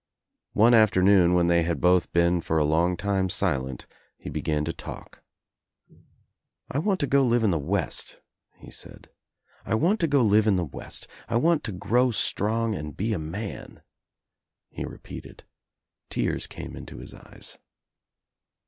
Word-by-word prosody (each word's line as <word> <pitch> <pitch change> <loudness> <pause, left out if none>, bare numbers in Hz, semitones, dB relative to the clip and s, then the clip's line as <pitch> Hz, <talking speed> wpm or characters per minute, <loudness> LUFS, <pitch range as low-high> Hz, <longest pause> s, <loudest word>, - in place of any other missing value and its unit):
One 115 +3 +5
afternoon 95 -4 +5
when 90 -1 +3
they 85 0 +3
had 85 0 -1
both 90 0 +3
been 85 0 +2
for 80 - -1
a 75 - +3
long 85 +4 +2
time 95 0 0
silent 65 -6 -2 0.3
he - - -8
began 75 -1 -1
to 85 - -3
talk. - - -10 1.5
"I 140 - 0
want 190 +3 0
to - - +2
go 140 0 +3
live 120 -2 +2
In 105 - +3
the 85 - 0
West," 90 +7 -2 0.4
he - - -14
said. - - -11 0.5
"I 110 - -1
want 175 - +2
to 165 - +2
go 140 -3 +3
live 110 0 +4
in 105 - +4
the 90 -2 0
West. 70 - -4 0.2
I 115 - -1
want 165 +4 +2
to 110 - -3
grow 120 +7 +1
strong 115 0 0
and 75 -6 -6
be 110 +3 -1
a 95 - -2
man," 95 +7 -7 0.9
he - - -5
repeated., - - -10 0.7
Tears - - -1
came - - -8
Into - - -9
his - - -10
eyes. - - -11
100 Hz, 160 wpm, -26 LUFS, 85-115 Hz, 1.5 s, One